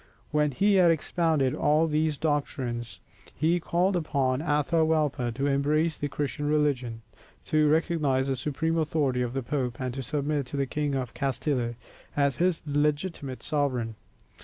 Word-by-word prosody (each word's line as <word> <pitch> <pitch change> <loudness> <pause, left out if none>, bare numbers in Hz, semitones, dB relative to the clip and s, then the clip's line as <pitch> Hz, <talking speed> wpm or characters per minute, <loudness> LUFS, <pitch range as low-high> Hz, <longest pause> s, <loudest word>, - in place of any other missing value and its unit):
When 150 0 +2
he 200 +10 +2
had 180 -2 +6
expounded 160 -3 +1
all 155 +1 +3
these 155 -1 0
doctrines, 130 -6 -2 0.4
he 165 +3 +2
called 180 +3 +1
upon 140 -5 0
Atahualpa 150 -4 +1
to 140 - -1
embrace 150 +3 +1
the 145 - -3
Christian 145 +1 -3
religion, 130 -7 0 0.4
to 155 -1 +3
recognize 150 -4 +1
the 135 - 0
supreme 150 +5 -1
authority 145 -5 0
of 120 -1 -2
the 135 -1 -2
Pope, 125 -2 -2
and 130 -1 -3
to 135 - -4
submit 145 +1 -1
to 140 - -5
the 140 - +1
King 145 +1 -2
of 125 -3 -3
Castille 130 -3 -1 0.4
as 140 -3 +2
his 175 -1 +1
legitimate 145 -1 -1
sovereign. 130 -7 -1
145 Hz, 150 wpm, -27 LUFS, 130-155 Hz, 0.4 s, had